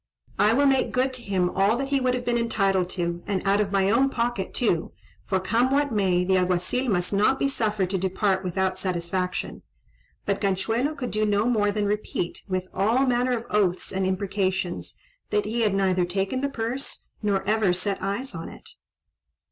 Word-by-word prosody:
I 210 +2 +5
will 285 +4 +3
make 270 -1 +3
good 260 +1 +1
to 255 - -4
him 185 -5 0
all 200 +4 +2
that 270 +1 -3
he 280 -1 +2
would 255 0 +2
have 245 -1 -4
been 240 - +1
entitled 195 -5 +1
to, 175 -1 -2
and 200 -2 -1
out 200 +1 +4
of 200 -2 -1
my 195 0 +2
own 265 +5 +3
pocket 235 -6 -2
too; 180 -10 0 0.3
for, 190 - +1
come 230 +7 +1
what 285 +1 +1
may, 190 -4 +2
the 190 +1 +3
Alguazil 180 +8 0
must 180 -1 0
not 210 +7 +3
be 275 - +1
suffered 210 -8 0
to 190 - 0
depart 190 +1 0
without 190 +1 -1
satisfaction." 180 0 -2 0.6
But 200 -1 -1
Ganchuelo 225 +9 0
could 255 -4 -4
do 215 0 0
no 210 0 +2
more 215 -4 +2
than 210 0 -1
repeat, 205 -4 -2
with 185 0 -2
all 225 +8 +2
manner 250 0 +1
of 230 - -7
oaths 190 -4 +1
and 190 0 0
imprecations, 190 -1 -2 0.3
that 210 -1 +1
he 230 +3 -1
had 210 -3 +2
neither 185 -2 +2
taken 195 +8 -1
the 280 - 0
purse, 245 +2 -4
nor 200 -3 0
ever 210 -1 +2
set 190 +2 -1
eyes 200 +8 -3
on 165 -1 -6
it. - - -13
200 Hz, 195 wpm, -25 LUFS, 190-240 Hz, 0.6 s, I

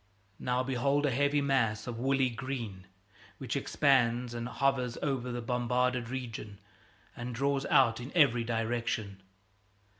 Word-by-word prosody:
Now, 125 +1 0
behold 140 +3 +1
a 140 - +2
heavy 145 +3 +2
mass 115 -7 +1
of 120 -2 -5
woolly 135 0 +2
green 115 -7 -5 0.5
which 130 -2 -4
expands 125 -4 +2
and 120 0 -4
hovers 130 -2 0
over 130 -4 -1
the 120 -1 -4
bombarded 125 0 0
region 115 -5 -6 0.6
and 120 0 -5
draws 140 +2 0
out 120 -4 +4
in 125 +3 -7
every 125 -8 +4
direction. 115 -3 -2
125 Hz, 130 wpm, -31 LUFS, 115-135 Hz, 0.6 s, out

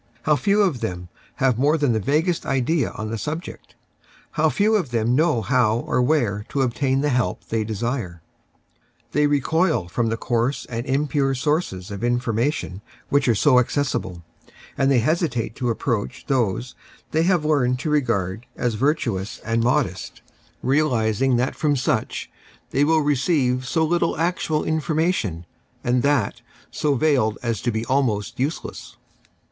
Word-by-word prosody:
How 150 - +3
few 205 +6 +2
of 165 -11 0
them 90 -3 -4 0.3
have 130 -4 +1
more 150 +4 +3
than 145 -5 +2
the 110 - +1
vaguest 155 - 0
ideas 135 +4 0
on 110 0 -4
the 115 - -3
subject! 160 - -6 0.6
How - - +2
few 210 +2 +2
of 180 -11 0
them 115 0 +1
know 145 -6 +2
how 120 -2 +2
or 125 - 0
where 120 -7 +1
to 140 - 0
obtain 130 +2 0
the 150 - +1
help 120 -8 0
they 110 -1 0
desire! 110 - -3 0.9
They 150 0 +3
recoil 150 - +1
from 115 +5 0
the 115 - -1
coarse 120 +3 -1
and 120 +2 -5
impure 135 0 +1
sources 125 - -1
of 100 - -5
infor 120 +1 0
mation 115 -5 -1 0.3
which 140 -1 +2
are 120 - +4
so 125 +3 +5
accessible, 120 -9 -2 0.5
and 135 - +2
they 130 -4 +4
hesitate 135 - 0
to 125 - -1
approach 115 +1 -2
those 125 -2 0 0.4
they 160 - +2
have 175 -2 +2
learned 130 -5 +2
to 155 - -2
regard 115 -7 0
as 120 -2 -1
virtuous 115 -6 -1
and 115 +1 +1
modest, 125 -7 -1 0.4
vii 135 +4 +3
viii 155 - +1
Preface 110 -4 0
lealising 135 -2 +3
that 125 +2 0
from 150 -2 +1
such 125 -3 -1 0.4
they 140 - +2
will 160 +1 +3
receive 130 -3 +1
so 160 +2 +1
little 170 0 +1
actual 160 -2 0
information, 155 - -1 0.4
and 125 0 +2
that 140 -7 +1 0.3
so 145 -2 0
veiled 130 -7 +2
as 115 -4 -1
to 120 - 0
be 110 +1 -2
almost 120 -7 0
useless. 145 +6 -4
130 Hz, 165 wpm, -22 LUFS, 115-150 Hz, 0.9 s, so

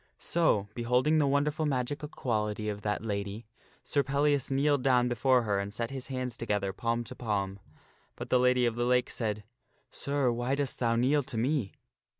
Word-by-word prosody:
So, 160 -12 +1
beholding 125 +7 +2
the 145 - +3
wonderful 150 +2 +1
magical 145 +2 -2
quality 105 -5 -2
of 105 -1 -4
that 105 +1 -2
lady, 100 +1 -3 0.4
Sir 145 - +1
Pellias 140 0 +1
kneeled 140 +1 +2
down 125 -2 +3
before 125 +1 +3
her 100 -3 0
and 100 +1 -4
set 115 +3 -4
his 135 -2 -4
hands 130 -2 -3
together, 105 -4 -1
palm 115 +3 -1
to - - -9
palm. 100 -4 -2 0.6
But - - -8
the 125 - +5
Lady 125 0 +3
of 120 - +1
the 120 +1 -1
Lake 125 0 +2
said, 105 -3 -2 0.3
" - - -39
Sir, 140 -3 0
why 120 +3 -1
dost 140 -2 -2
thou 115 -2 +2
kneel 135 +5 +3
to 130 -3 -6
me?" 125 -3 0
125 Hz, 185 wpm, -30 LUFS, 110-140 Hz, 0.6 s, the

